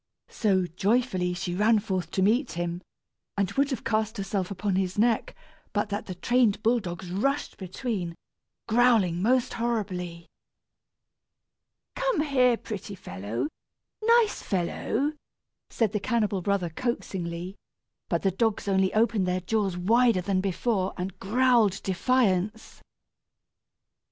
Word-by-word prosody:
So, 190 -5 +1
joyfully, 185 0 0
she 175 0 -3
ran 215 +4 +4
forth 190 -5 -2
to 190 - 0
meet 235 +8 +2
him, 175 +1 -3 0.6
and 200 -2 +1
would 280 0 +1
have 265 - -3
cast 220 0 0
herself 195 -1 -2
upon 200 0 -1
his 185 0 -1
neck, 225 +1 +1 0.4
but 205 0 0
that 205 +1 -3
the 185 - -5
trained 230 +1 +2
bull 235 +2 +3
dogs 175 -3 -6
rushed 275 +10 -1
between, 185 -2 -4 0.5
growling 220 -7 +3
most 250 +4 +2
horribly. 185 -8 -3 1.7
"Come - - +1
here, 255 -5 +3
pretty 205 -2 -6
fellow, 110 - -4 0.6
nice 460 -1 +4
fellow," 220 - -1 0.6
said 225 -4 +1
the 210 - -1
cannibal 210 -3 0
brother, 185 -2 0
coaxingly; 180 -5 -3 0.5
but - - 0
the 195 - +3
dogs 220 +2 0
only 190 -1 +2
opened 215 -4 +2
their 180 0 0
jaws 195 -1 0
wider 230 +2 +3
than 185 +1 0
before 195 0 -1
and 185 +1 -5
growled 230 -2 +3
defiance. 210 0 0
200 Hz, 125 wpm, -27 LUFS, 185-235 Hz, 1.7 s, ran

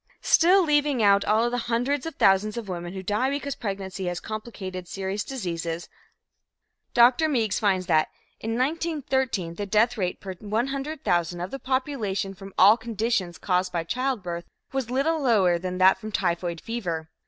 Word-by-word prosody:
Still, 365 +3 +5
leaving 295 -6 +2
out 200 0 +5
all 220 +3 +3
the 245 - -1
hundreds 255 +6 0
of 325 - -6
thousands 200 +3 +3
of 230 -3 -5
women 175 -1 -5
who 190 - -5
die 210 +7 0
because 280 0 -2
pregnancy 195 -4 -5
has 175 -1 -2
complicated 195 -5 -6
serious 195 +2 -3
diseases, 170 -9 -4 1.1
Dr. 245 +6 +5
Meigs 230 -8 +1
finds 190 -3 +1
that 155 -2 +2 0.3
"in 225 +1 -3
1913, 265 - -1
the 205 +3 -5
death 220 +4 +2
rate 180 -2 -1
per 190 -1 -6
100,000 220 - -1
of 180 +2 -4
the 270 - -5
population 250 -8 -2
from 195 0 -11
all 205 +4 +7
conditions 220 -6 -2
caused 180 -1 0
by 170 -2 -1
childbirth 185 -6 -2 0.3
was 265 -3 -2
little 295 +5 +1
lower 195 -9 +3
than 180 +1 -4
that 185 +1 +5
from 215 - -7
typhoid 175 -3 -1
fever. 170 -9 -4
210 Hz, 160 wpm, -25 LUFS, 185-255 Hz, 1.1 s, all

